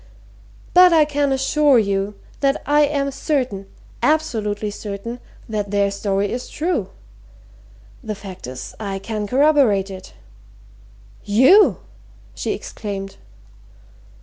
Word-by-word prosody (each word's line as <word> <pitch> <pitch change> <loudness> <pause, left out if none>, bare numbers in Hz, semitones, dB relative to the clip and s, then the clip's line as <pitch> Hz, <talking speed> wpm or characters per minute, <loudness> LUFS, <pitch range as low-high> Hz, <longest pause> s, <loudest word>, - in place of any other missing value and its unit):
"But 360 0 +8
I 315 -2 +5
can 290 -1 0
assure 270 +1 +3
you 200 -1 0 0.2
that 275 -1 +1
I 295 +1 +3
am 280 -1 -1
certain 255 -9 -2 0.3
absolutely 215 -9 0
certain! 210 +4 -6 0.3
that 210 -2 -3
their 200 0 +1
story 200 0 -1
is 250 +1 -5
true. 305 - -2 1.1
The 215 -1 -4
fact 195 - -9
is 130 0 -8
I 200 -3 -4
can 210 +1 -4
corroborate 255 -8 +3
it." 185 - -10 1.1
"You!" 260 - +5 0.5
she - - -3
exclaimed. 195 -2 -6
215 Hz, 110 wpm, -20 LUFS, 200-285 Hz, 1.1 s, But